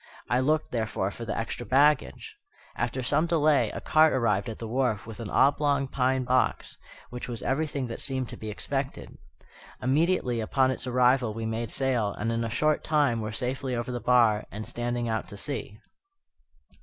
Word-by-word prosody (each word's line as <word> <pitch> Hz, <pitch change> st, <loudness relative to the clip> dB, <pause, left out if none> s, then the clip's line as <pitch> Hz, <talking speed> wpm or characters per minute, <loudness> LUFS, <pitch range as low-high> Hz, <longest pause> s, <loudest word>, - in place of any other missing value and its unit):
I 120 Hz, -, +3 dB
looked, 155 Hz, +4 st, +1 dB
therefore, 110 Hz, -4 st, -1 dB
for 115 Hz, -, -8 dB
the 105 Hz, -, -3 dB
extra 115 Hz, +1 st, -3 dB
baggage. 140 Hz, +3 st, +2 dB, 0.4 s
After 130 Hz, -, -2 dB
some 155 Hz, +7 st, +2 dB
delay 150 Hz, -8 st, +3 dB
a -, -, -5 dB
cart 155 Hz, 0 st, +4 dB
arrived 105 Hz, -5 st, +1 dB
at 110 Hz, -, -6 dB
the 115 Hz, -, -6 dB
wharf 120 Hz, -3 st, 0 dB
with 110 Hz, 0 st, -9 dB
an 115 Hz, -3 st, -5 dB
oblong 140 Hz, +1 st, +3 dB
pine 130 Hz, 0 st, 0 dB
box, 130 Hz, 0 st, 0 dB, 0.4 s
which 125 Hz, 0 st, -6 dB
was 120 Hz, -2 st, -6 dB
everything 140 Hz, -1 st, -1 dB
that 115 Hz, -1 st, -6 dB
seemed 130 Hz, -2 st, -2 dB
to -, -, -6 dB
be 110 Hz, -, -7 dB
expected. 135 Hz, +6 st, -4 dB, 0.6 s
Immediately 135 Hz, -2 st, +1 dB
upon 130 Hz, +4 st, +2 dB
its 130 Hz, -, -5 dB
arrival 125 Hz, -2 st, +3 dB
we 115 Hz, 0 st, -4 dB
made 110 Hz, 0 st, -3 dB
sail, 125 Hz, -6 st, 0 dB
and 115 Hz, +2 st, -2 dB
in 115 Hz, 0 st, -1 dB
a 115 Hz, -, -2 dB
short 150 Hz, +6 st, +1 dB
time 145 Hz, -7 st, +2 dB
were 110 Hz, 0 st, -4 dB
safely 130 Hz, +2 st, -3 dB
over 120 Hz, +1 st, -3 dB
the 120 Hz, -, -3 dB
bar 115 Hz, -4 st, +3 dB
and 105 Hz, +1 st, -6 dB
standing 120 Hz, 0 st, -2 dB
out 110 Hz, -1 st, -2 dB
to 100 Hz, -, -10 dB
sea. 110 Hz, -4 st, -4 dB
125 Hz, 180 wpm, -27 LUFS, 115-135 Hz, 0.6 s, cart